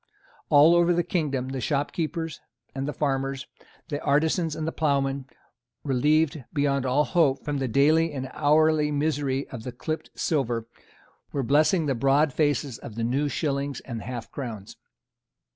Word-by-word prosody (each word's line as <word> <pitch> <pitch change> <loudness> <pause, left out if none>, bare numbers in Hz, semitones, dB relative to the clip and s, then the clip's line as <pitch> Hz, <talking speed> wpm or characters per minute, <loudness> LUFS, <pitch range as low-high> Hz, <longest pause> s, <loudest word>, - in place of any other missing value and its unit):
All 150 +2 +7
over 175 0 +4
the 175 - +2
kingdom 140 -8 -1
the 135 -1 -4
shopkeepers 160 +4 -2 0.3
and 135 +1 -3
the - - -1
farmers, 135 -2 -2 0.4
the 145 -2 -3
artisans 155 +3 +1
and 155 - -3
the - - -1
ploughmen, 140 -3 0 0.6
relieved, 150 +2 +1
beyond 140 -3 0
all 135 +4 +3
hope, 145 -4 +1
from 145 -1 -2
the 135 - -1
daily 155 +6 +3
and 130 -2 -4
hourly 150 0 +3
misery 145 -2 -1
of 125 -5 -7
the 125 - -6
clipped 155 +6 -5
silver, 120 -7 -1 0.7
were 140 - -1
blessing 155 - +3
the 140 - +1
broad 135 +4 +2
faces 145 -4 0
of 110 - -9
the 115 - -2
new 135 +5 0
shillings 140 0 -2
and 115 -4 -6
half 120 0 -6
crowns. 115 -8 -7
145 Hz, 155 wpm, -26 LUFS, 135-155 Hz, 0.7 s, All